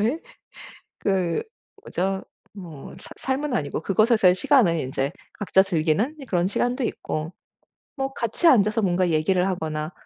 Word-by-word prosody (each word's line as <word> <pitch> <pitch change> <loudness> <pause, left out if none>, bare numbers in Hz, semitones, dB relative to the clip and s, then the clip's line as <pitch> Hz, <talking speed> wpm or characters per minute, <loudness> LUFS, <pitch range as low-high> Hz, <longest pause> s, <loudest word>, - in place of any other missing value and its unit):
그곳에서의 285 +9 0 0.8
그 185 -4 0 0.4
뭐죠 190 +1 -2 0.3
뭐 170 -8 -10
사 - - -13
삶은 270 +1 -2
아니고 150 -6 -2
그곳에서의 215 -1 +4
시간을 185 - +3
인제 135 +2 -2 0.2
각자 190 -2 +3
즐기는 185 - 0
그런 180 -2 +1
시간도 245 +5 -1
있고, 155 -4 -4 0.6
뭐 270 0 -2
같이 235 +9 -1
앉아서 215 -5 +5
뭔가 180 -1 +1
얘기를 180 +4 +2
하거나 160 -3 -3
190 Hz, 305 characters per minute, -24 LUFS, 165-230 Hz, 0.8 s, 앉아서